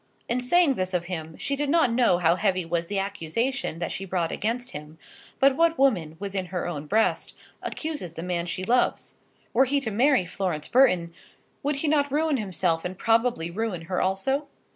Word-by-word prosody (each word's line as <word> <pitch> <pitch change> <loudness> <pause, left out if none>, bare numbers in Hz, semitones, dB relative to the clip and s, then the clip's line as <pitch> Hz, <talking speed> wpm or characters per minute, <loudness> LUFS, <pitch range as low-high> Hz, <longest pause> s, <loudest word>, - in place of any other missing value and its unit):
In 245 +1 0
saying 305 +4 +4
this 185 -5 -2
of 175 -1 -1
him, 160 -3 -6
she 280 - -2
did 290 0 -2
not 325 -5 +4
know 235 -7 +4
how 170 -1 +3
heavy 185 -3 0
was 170 0 -1
the 200 - -3
accusation 200 +4 -2
that 170 -1 -3
she 195 - -4
brought 175 -3 -1
against 245 +4 -2
him; 150 +2 -9 0.4
but 270 0 +5
what 330 +2 +3
woman, 185 - +2
within 195 -1 -4
her 180 0 -3
own 150 -4 -5
breast, 220 +6 +1 0.2
accuses 300 - -4
the 165 - -6
man 175 -1 -2
she 185 +2 -3
loves? 245 +5 0 0.3
Were 260 +4 +5
he 280 +2 +1
to 225 -5 -2
marry 250 -1 +3
Florence 175 -4 -3
Burton, 180 -10 +3 0.5
would 290 +1 0
he 285 +3 -2
not 290 -2 +2
ruin 305 0 +1
himself, 180 -6 -1
and 180 +1 -5
probably 225 -7 +1
ruin 205 -2 -3
her 180 +2 -2
also? 230 +10 0
195 Hz, 190 wpm, -26 LUFS, 175-265 Hz, 0.5 s, but